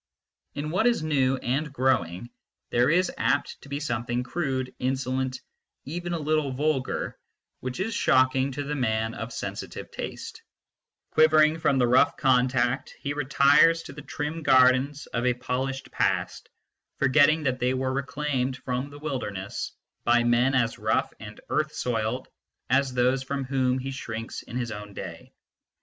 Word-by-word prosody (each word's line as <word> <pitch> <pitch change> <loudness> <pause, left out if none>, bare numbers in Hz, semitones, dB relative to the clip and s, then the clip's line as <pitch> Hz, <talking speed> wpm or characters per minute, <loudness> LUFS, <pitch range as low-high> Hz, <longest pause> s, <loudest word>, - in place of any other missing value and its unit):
In 150 +2 -3
what 190 +7 +2
is 235 -9 +2
new 135 -4 +2
and 135 +4 -2
growing 120 - 0 0.4
there 120 +2 +3
is 180 +3 +3
apt 125 +5 0
to 140 - -14
be 140 +1 -3
something 120 -3 -2
crude, 130 -4 -2
insolent, 130 0 -1 0.5
even 175 +4 -4
a - - 0
little 155 -2 0
vulgar, 140 -1 -1 0.4
which 130 +3 -5
is 220 +4 -1
shocking 130 -4 +3
to 145 +2 -3
the 145 +1 -3
man 110 -4 0
of 115 +2 -6
sensitive - - -6
taste; - - -7 0.7
quivering 155 0 +5
from 145 -4 +2
the 125 - +4
rough 125 +2 +4
contact, 125 -1 +2
he 145 - -3
retires 145 +3 +4
to - - -9
the 150 - -9
trim 150 +2 -4
gardens 130 +1 +4
of 120 - -3
a 125 - +2
polished 130 +1 -3
past, - - -1 0.5
forgetting 145 +3 +4
that 130 -2 0
they 125 +1 +1
were 130 0 -1
reclaimed 140 -2 -2
from 125 +2 -3
the 145 - -11
wilderness 125 -10 -4 0.3
by 120 0 +4
men 120 +3 +3
as 115 -2 +1
rough - - 0
and 105 -1 -10
earth 150 0 0
soiled 120 +1 -2 0.4
as 135 0 +3
those 125 +1 +2
from 140 +1 -3
whom 130 -1 +1
he 135 +1 -4
shrinks 115 -4 -6
in 120 - -7
his 120 -2 -2
own 105 -1 -8
day. - - -8
130 Hz, 155 wpm, -26 LUFS, 125-145 Hz, 0.7 s, quivering